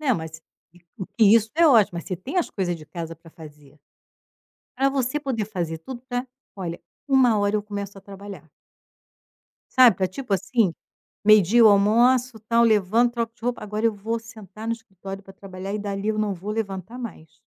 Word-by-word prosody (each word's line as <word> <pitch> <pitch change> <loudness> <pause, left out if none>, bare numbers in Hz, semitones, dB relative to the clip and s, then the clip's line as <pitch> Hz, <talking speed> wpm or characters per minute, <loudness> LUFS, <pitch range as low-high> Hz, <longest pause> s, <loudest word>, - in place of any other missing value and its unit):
Não, 275 -5 +2
mas 160 -2 -7 0.3
e 175 - -20 0.2
o 190 - -5
que 225 - +1
isso 220 -1 0
é 335 +1 +5
ótimo, 230 -11 +5
mas 170 - -7
você 185 - -4
tem 260 - -7
as 350 - -1
coisas 180 -3 -2
de 155 -2 -13
casa 165 -1 -6
para 165 +1 -17
fazer. 150 -3 -15 1.0
Pra 270 +2 +3
você 270 +1 -1
poder 255 -7 -2
fazer 170 -6 -4
tudo 240 +9 -9
pra 245 +1 -2 0.3
olha, 175 -3 -5 0.3
1 255 -5 +4
hora, 205 +1 +1
eu 210 - -2
começo 200 -1 -6
a - - -13
trabalhar. 195 -4 -11 1.2
Sabe, 250 -7 +7
pra 185 - +1
tipo 210 +5 -6
assim: 200 0 +1 0.5
meio-dia 215 +1 +6
eu 225 - +9
almoço, 235 +4 +3
tal, 235 0 +4
levanto, 220 +2 +3
troco 230 -1 -3
de 230 - -32
roupa, 245 0 -2
agora 210 +2 -1
eu 225 - +1
vou 220 +3 -3
sentar 220 -2 -11
no 230 - 0
escritório 195 -4 -9
pra 195 - -14
trabalhar 190 0 -8
e 210 - -2
dali 200 0 -3
eu 215 0 0
não 210 -2 0
vou 190 +4 -7
levantar 215 +1 -5
mais. 185 -10 -9
210 Hz, 195 wpm, -24 LUFS, 190-235 Hz, 1.2 s, eu